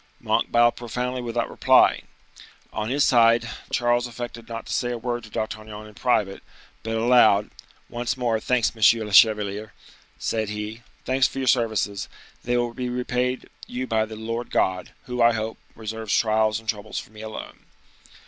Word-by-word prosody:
Monk - - 0
bowed 120 0 +4
profoundly 125 +1 -3
without 120 -1 -2
replying. - - +3 0.7
On 110 0 -3
his 140 +3 +2
side, 120 -2 +4 0.2
Charles 120 0 +1
affected 120 -1 -8
not 115 0 -6
to - - -5
say 120 - 0
a 120 - -3
word 120 0 -3
to - - -13
D'Artagnan 110 0 -5
in 105 - -13
private, 105 -5 0 0.4
but 115 0 -3
aloud,—"Once 120 +1 +1
more, 120 -3 0
thanks, 120 0 +1
monsieur 110 0 +4
le 105 - -7
chevalier," 105 -1 +4 0.4
said 110 -2 -2
he, 105 +2 -5 0.2
"thanks 130 +1 +3
for - - -10
your 135 -1 -2
services. 110 -5 +1 0.3
They 120 0 0
will 120 -1 -1
be 125 0 -3
repaid 125 +1 -2 0.2
you 125 +1 -4
by 110 -3 +1
the 110 - -8
Lord 115 +2 -4
God, 90 -1 0
who, 125 -1 -3
I 120 0 +6
hope, 110 0 -4 0.2
reserves 110 -1 -2
trials 110 -1 +2
and 115 - -18
troubles 105 -1 -3
for - - -6
me 110 0 -11
alone." 110 0 -8
115 Hz, 165 wpm, -24 LUFS, 110-120 Hz, 0.7 s, I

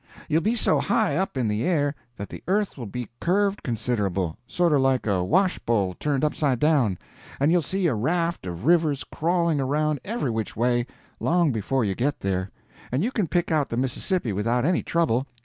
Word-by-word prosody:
You'll 155 +2 +2
be 220 +7 +1
so 230 - +4
high 215 -4 +1
up 190 -5 -1
in 125 -3 +1
the 105 +1 -1
air 145 -5 +1 0.2
that 100 - -6
the - - -8
earth 205 +2 +1
will 120 -5 -7
be 120 +2 -5
curved 200 +3 +1
considerable—sorter 115 - -1
like 135 -1 +2
a 95 -4 +1
washbowl 115 - +1
turned 145 -1 0
upside 145 -4 +1
down—and 140 - 0
you'll 175 0 +4
see 190 +5 -1
a 160 - +3
raft 165 - -1
of 90 +5 -6
rivers 155 -4 +3
crawling 170 -1 0
around 150 +2 0
every 205 - -2
which 110 -2 -3
way, 120 +1 +1 0.3
long 170 -3 +2
before 120 +2 0
you 100 - 0
get 135 +8 -1
there, 95 -1 -1 0.4
and 130 +7 0
you 240 - 0
can 210 -8 0
pick 175 0 0
out 150 -3 +1
the 115 - -3
Mississippi 130 - -1
without 115 +6 0
any 175 +1 +2
trouble. 140 -6 0
140 Hz, 185 wpm, -25 LUFS, 115-170 Hz, 0.4 s, so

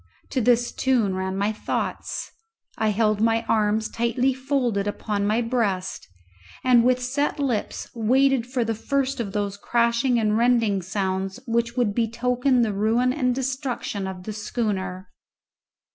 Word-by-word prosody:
To 260 - 0
this 240 +1 +3
tune 240 -7 +1
ran 190 0 -2
my 200 +2 +1
thoughts. 215 - -3 0.4
I 220 -1 +1
held 215 0 +1
my 225 0 +2
arms 215 0 +2
tightly 240 +3 0
folded 250 -6 -1
upon 205 0 -2
my 220 +3 +2
breast, 210 -6 -1 0.6
and 245 -2 +5
with 255 +1 +3
set 275 +4 -1
lips 255 -7 -2
waited 255 +2 +2
for 250 -2 -1
the 225 - 0
first 270 +4 -1
of 215 -4 -3
those 200 -1 -2
crashing 235 +3 +1
and 215 -2 +2
rending 230 -4 +2
sounds 190 +1 -2
which 235 0 -1
would 235 -5 +2
betoken 245 +3 +1
the 215 -3 0
ruin 225 +5 +2
and 250 -4 0
destruction 255 -6 -3
of 185 -1 -7
the 215 - -5
schooner. 200 -4 -3
230 Hz, 145 wpm, -24 LUFS, 205-250 Hz, 0.6 s, and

